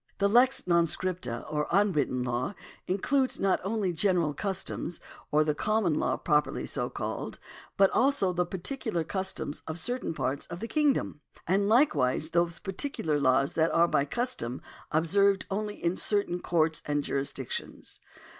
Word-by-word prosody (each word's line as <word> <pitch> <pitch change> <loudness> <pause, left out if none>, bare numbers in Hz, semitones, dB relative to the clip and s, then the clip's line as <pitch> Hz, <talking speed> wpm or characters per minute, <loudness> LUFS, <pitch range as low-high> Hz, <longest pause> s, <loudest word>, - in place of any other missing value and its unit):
The 200 - +3
lex 250 +5 +4
non 170 -1 +4
scripta, 165 -10 -2
or 150 -1 -1
unwritten 155 -10 +1
law, 125 +9 -2 0.3
includes 255 +8 +1
not 195 -1 +2
only 195 -2 -1
general 170 -3 +1
customs, 190 -2 -3 0.3
or 150 +1 +3
the 150 -1 +1
common 215 0 +1
law - - 0
properly 150 -1 0
so - - -2
called; - - -5 0.4
but 195 -1 +5
also 260 -9 +2
the 180 0 +1
particular 190 - -3
customs 190 -4 -4
of 160 0 -4
certain 245 -2 -1
parts 140 -1 -2
of 170 - -7
the 230 - -4
kingdom; 290 - +1 0.2
and 200 +3 +2
likewise 155 - +3
those 170 0 +1
particular 190 - -2
laws 135 0 +2
that 160 0 +2
are 170 +1 +5
by 140 - +2
custom 145 - -2 0.3
ob 160 +2 +2
served 200 +2 +3
only 210 +1 -2
in 170 +1 -1
certain 200 -4 +1
courts 160 -3 +1
and 145 -1 0
jurisdictions." 135 -2 -4
175 Hz, 155 wpm, -29 LUFS, 150-205 Hz, 0.4 s, but